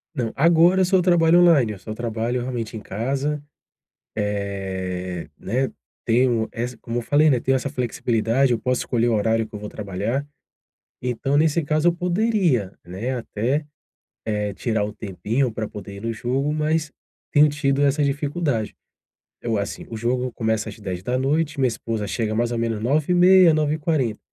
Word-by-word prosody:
Não, 120 -5 -2
agora 170 +4 +5
eu - - +5
só 185 +1 +3
trabalho 175 -1 +5
online, 150 -11 +5
eu 100 - -9
só 110 +3 -7
trabalho 115 +2 -2
realmente 120 -3 -4
em - - -5
casa, 135 +9 -2 0.8
eh, 95 -4 -3
né, 130 +6 -1 0.4
tenho 120 -1 +2
essa 120 +1 -4
como 120 +1 -3
eu - - -4
falei, 145 +6 +4
né, 130 - +4
tenho 135 - +2
essa 140 - -3
flexibilidade, 120 -1 +1
eu 115 - -1
posso 125 +2 0
escolher 120 0 +1
o - - +1
horário 110 +1 +1
que 110 - -17
eu 105 - -5
vou 105 - -6
trabalhar. 105 +7 -3 0.8
Então, 130 +3 0
nesse 160 +1 +2
caso, 155 +3 +2
eu - - +4
poderia, 175 - +1
né, 100 +9 -4
até, 125 +5 -1 0.6
eh, 105 -2 -2
tirar 110 -2 -1
um 105 - -4
tempinho 110 +5 -2
pra 110 -1 -4
poder 100 -1 -9
ir - - -9
no 115 0 -2
jogo, 130 +6 -1
mas 155 0 0 0.4
tenho 150 +1 +6
tido 140 -1 0
essa 145 +1 +3
dificuldade. 140 -4 -1 0.7
Eu, 115 -2 -1
assim, 100 +1 -4
o 115 - -6
jogo 125 +2 -1
começa 110 -2 -1
às - - -10
22h, 130 - -1
minha 130 -2 +3
esposa 115 -2 -3
chega 110 +1 -2
mais 120 +1 0
ou 120 - -1
menos 115 -2 -1
9:30h, 175 +7 +5
9:40h. 150 -6 0
125 Hz, 170 wpm, -23 LUFS, 110-150 Hz, 0.8 s, tenho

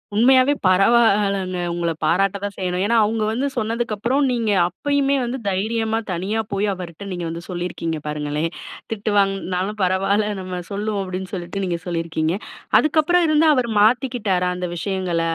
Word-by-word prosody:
உண்மையாவே 260 +4 +5
பரவால்லங்க. 195 -2 +3
உங்கள 170 -1 -1
பாராட்ட 195 +4 +2
தான் 200 -1 -4
செய்யணும். 180 -1 -1
ஏன்னா 230 +2 +2
அவங்க 215 +1 0
வந்து 255 +5 -1
சொன்னதுக்கு 225 0 -1
அப்புறம், 250 +7 +1
நீங்க 230 -3 0 0.2
அப்பயுமே 280 +8 0
வந்து 245 +2 -3
தைரியமா 220 +3 0
தனியா 195 +6 -1
போயி 200 +1 0
அவர்ட்ட 180 +2 -8
நீங்க 175 -1 -4
வந்து 170 +1 -6
சொல்லியிருக்கீங்க 175 -3 -3
பாருங்களேன். 150 +2 -2 0.4
"திட்டு 210 -1 -2
வாங்கனாலும் 195 +1 0
பரவாயில்ல 195 +3 +1
நம்ம 185 -1 -5
சொல்லுவோம்" 205 0 -2
அப்படின்னு 185 0 -5
சொல்ட்டு 185 +2 -4
நீங்க 170 -2 -2
சொல்லியிருக்கீங்க. 165 0 -1 0.4
அதுக்கப்புறம் 315 +3 +3
இருந்து, 310 +1 +4
அவரு 245 -2 0
மாத்திக்கிட்டாரா 220 -6 +2
அந்த 180 0 -3
விஷயங்கள? 185 -2 -1
195 Hz, 145 wpm, -21 LUFS, 180-225 Hz, 0.4 s, உண்மையாவே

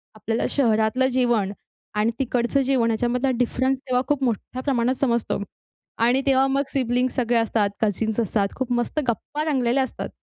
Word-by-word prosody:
आपल्याला 225 +1 -2
शहरातलं 235 0 +2
जेवण 240 -6 +1 0.4
आणि 215 +2 +2
तिकडचं 250 +1 +1
जेवण 255 -3 +2
ह्याच्यामधला 245 +4 0
डिफरन्स 260 +2 +1
तेव्हा 250 0 +2
खूप 290 -2 0
मोठ्या 250 +2 -2
प्रमाणात 255 -2 +1
समजतो. 235 -6 0 0.6
आणि 245 +4 +3
तेव्हा 270 0 +4
मग 275 +1 +1
सिबलिंग्स 250 -1 0
सगळे 240 -2 +1
असतात, 225 -2 +1
कझन्स 220 +1 0
असतात, 205 -2 0
खूप 260 -2 -3
मस्त 240 +5 -1
गप्पा 290 +6 -2
रंगलेल्या 260 -1 +2
असतात. 260 - -5
245 Hz, 150 wpm, -23 LUFS, 230-260 Hz, 0.6 s, तेव्हा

